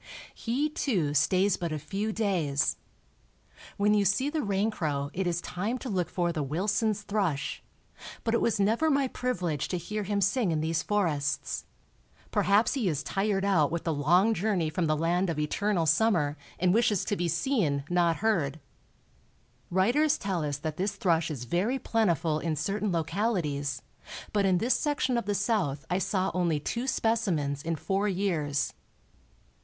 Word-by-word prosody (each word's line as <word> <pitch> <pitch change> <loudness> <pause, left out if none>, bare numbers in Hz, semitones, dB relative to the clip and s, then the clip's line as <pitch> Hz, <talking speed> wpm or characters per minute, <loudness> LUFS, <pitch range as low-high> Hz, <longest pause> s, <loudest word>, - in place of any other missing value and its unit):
He, 255 +6 -1
too, 195 - -1
stays 185 +7 +3
but 170 -2 -3
a 155 - -1
few 195 +9 -3
days. 180 -11 0 1.0
When 205 +1 +3
you 205 -1 +3
see 210 +9 +1
the 315 - -1
raincrow 190 - -1
it 190 0 -1
is 175 -1 0
time 205 +9 -3
to 255 - -6
look 185 -4 -1
for 175 -1 0
the 160 -3 -2
Wilson's 205 - 0
thrush; 195 -9 -1 0.6
but 225 - 0
it 235 - +2
was 225 -2 +1
never 225 +10 +2
my 275 -2 +2
privilege 180 - -2
to 180 - -2
hear 210 +5 -4
him 200 0 -1
sing 200 0 +2
in 155 - 0
these 160 +1 0
forests. 165 -9 -1 0.7
Perhaps 205 +2 +3
he 245 -9 0
is 145 -3 -2
tired 195 0 0
out 170 -7 +3
with 170 0 -2
the 165 - 0
long 175 +10 +3
journey 190 -6 0
from 165 +1 0
the 155 0 +1
land 175 +3 +1
of 165 - -2
eternal 170 +4 0
summer 160 -3 +2 0.2
and 180 0 +2
wishes 220 -4 +2
to 205 - 0
be 175 -3 -1
seen, 165 - 0
not 175 -1 +2
heard. 160 -9 +1 1.1
Writers 245 - +3
tell 190 -5 -2
us 145 -2 -2
that 155 +1 -5
this 200 +2 -1
thrush 165 -4 +1
is 140 -6 -5
very 185 - 0
plentiful 175 - +1
in 160 -1 -1
certain 200 +6 -1
localities, 160 - -1 0.5
but 200 -2 +2
in 185 -2 +3
this 235 +8 +2
section 285 -4 0
of 235 -4 -1
the 205 - 0
South 200 - 0
I 180 - +2
saw 190 -1 0
only 170 -4 +1
two 235 - -3
specimens 185 - 0
in 165 +2 -2
four 190 +7 -1
years. 170 -7 -1
185 Hz, 170 wpm, -28 LUFS, 160-210 Hz, 1.1 s, stays